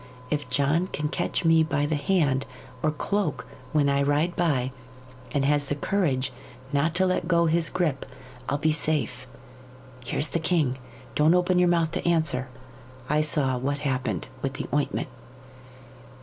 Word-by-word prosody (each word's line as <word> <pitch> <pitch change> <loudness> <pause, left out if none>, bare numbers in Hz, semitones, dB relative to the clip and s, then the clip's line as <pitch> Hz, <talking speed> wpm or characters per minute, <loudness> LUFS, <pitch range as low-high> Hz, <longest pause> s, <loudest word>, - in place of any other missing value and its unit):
If 150 -1 -1
John 155 +6 +2
can 150 -4 -3
catch 175 +2 -1
me 165 0 +6
by 155 -2 +1
the 150 - -1
hand 145 -4 +1 0.3
or 155 - +2
cloak 175 +2 -1 0.3
when 150 -2 +3
I 140 0 +2
ride 145 +5 +1
by, 135 -7 +1 0.6
and 140 -1 +1
has 145 0 +1
courage 140 -10 0 0.4
not 155 +4 +1
to 190 +2 +3
let 185 -2 0
go 170 -1 +3
his 165 0 +2
grip, 155 -7 -1 0.4
I'll 145 - +1
be 155 +1 +2
safe. 150 -5 -1 0.8
Here's 125 +5 0
the 170 - -1
king. 155 -6 +1 0.3
Don't 155 +3 +4
open 180 0 +3
your 180 -1 +4
mouth 165 -2 +2
to 180 0 -2
answer. 160 -6 +1 0.6
I 150 +1 +3
saw 140 -4 +1
what 140 +3 -1
happened 130 -2 -1
with 135 -1 -2
the 145 - -4
ointment." 145 -2 0
150 Hz, 155 wpm, -26 LUFS, 140-170 Hz, 0.8 s, me